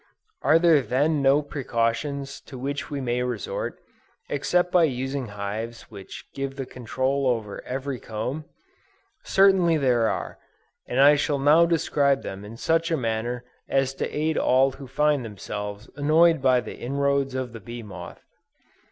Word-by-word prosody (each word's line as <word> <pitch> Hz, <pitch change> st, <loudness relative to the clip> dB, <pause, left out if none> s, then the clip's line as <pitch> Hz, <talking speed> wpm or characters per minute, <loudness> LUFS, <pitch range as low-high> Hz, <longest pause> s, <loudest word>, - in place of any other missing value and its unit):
Are 160 Hz, -, +5 dB
there 165 Hz, -3 st, +5 dB
then 145 Hz, +4 st, +1 dB
no 140 Hz, +2 st, +4 dB
precautions 140 Hz, +1 st, -2 dB
to 130 Hz, -, -9 dB
which 140 Hz, +3 st, -4 dB
we 145 Hz, -, -3 dB
may 125 Hz, -2 st, -1 dB
resort, 475 Hz, -, -3 dB, 0.5 s
except 180 Hz, 0 st, +1 dB
by 180 Hz, -2 st, +5 dB
using 135 Hz, -1 st, -3 dB
hives 105 Hz, +4 st, -6 dB
which 100 Hz, -3 st, -10 dB
give 135 Hz, 0 st, -4 dB
the 135 Hz, -1 st, -4 dB
control 130 Hz, +3 st, -1 dB
over 110 Hz, -5 st, -2 dB
every 130 Hz, 0 st, -4 dB
comb? 125 Hz, +8 st, -4 dB, 0.8 s
Certainly 190 Hz, -4 st, +4 dB
there 120 Hz, -5 st, +2 dB
are, -, -, -4 dB, 0.5 s
and 125 Hz, -, -1 dB
I 145 Hz, +2 st, +8 dB
shall 145 Hz, 0 st, 0 dB
now 150 Hz, +5 st, +5 dB
describe 145 Hz, -4 st, +2 dB
them 95 Hz, +1 st, -6 dB
in 110 Hz, +3 st, -9 dB
such 165 Hz, +5 st, +1 dB
a 165 Hz, -, +1 dB
manner 120 Hz, 0 st, -2 dB, 0.2 s
as 135 Hz, -1 st, +1 dB
to -, -, -3 dB
aid 155 Hz, +1 st, 0 dB
all 130 Hz, +1 st, +4 dB
who 135 Hz, 0 st, -10 dB
find 145 Hz, +1 st, +1 dB
themselves 105 Hz, 0 st, -6 dB
annoyed 155 Hz, +2 st, +4 dB
by 130 Hz, -2 st, +4 dB
the -, -, -9 dB
inroads 140 Hz, +1 st, 0 dB
of 130 Hz, -2 st, -3 dB
the 115 Hz, -, -7 dB
bee 120 Hz, +3 st, -8 dB
moth. 95 Hz, -4 st, -10 dB
135 Hz, 155 wpm, -25 LUFS, 120-150 Hz, 0.8 s, I